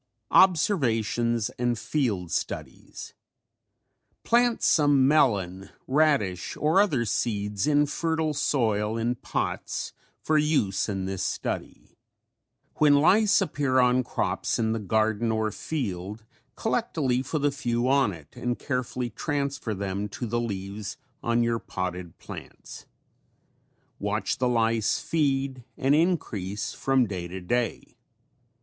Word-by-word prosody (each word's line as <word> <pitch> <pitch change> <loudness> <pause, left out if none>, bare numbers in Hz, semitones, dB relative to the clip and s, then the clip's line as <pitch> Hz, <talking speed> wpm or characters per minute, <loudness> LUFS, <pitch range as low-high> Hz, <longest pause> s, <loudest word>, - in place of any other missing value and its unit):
OBSERVATIONS 120 - +3
AND 120 -1 +1
FIELD 110 - -1
STUDIES - - -5 1.1
Plant 240 0 +2
some 145 -4 +4
melon, 100 - +2 0.2
radish 135 - +1
or 160 +6 +4
other 140 -13 +1
seeds 105 +1 -1
in 145 -1 +4
fertile 160 +1 -1
soil 110 -6 0
in 115 +2 0
pots 125 - -3 0.3
for 155 -1 +2
use 145 -12 +1
in 95 -2 -2
this 95 -1 -3
study. - - -5 0.8
When 150 -1 +5
lice 195 +8 +4
appear 140 -3 0
on 125 0 +4
crops - - -1
in 110 -1 0
the 115 - -1
garden 110 +2 +1
or 110 -1 0
field, 105 - -4 0.3
collect - - -2
a - - 0
leaf 130 -1 0
with 150 -2 +1
a 145 - +3
few 120 -3 -1
on 135 -4 +3
it 80 -5 -13
and 120 0 -2
carefully 125 -2 -3
transfer 140 -4 -2
them 100 +1 -3
to 120 - -5
the 120 +1 -1
leaves 100 -2 -5 0.2
on 120 -3 +1
your 115 0 0
potted 90 -3 -5
plants. - - -10 1.1
Watch - - -1
the 125 -1 +2
lice 115 -2 +1
feed 135 -5 -1
and 135 +2 +2
increase 110 - 0
from 135 -2 +2
day 95 -4 -5
to 95 +2 -6
day. 120 +6 -2
120 Hz, 125 wpm, -26 LUFS, 105-145 Hz, 1.1 s, When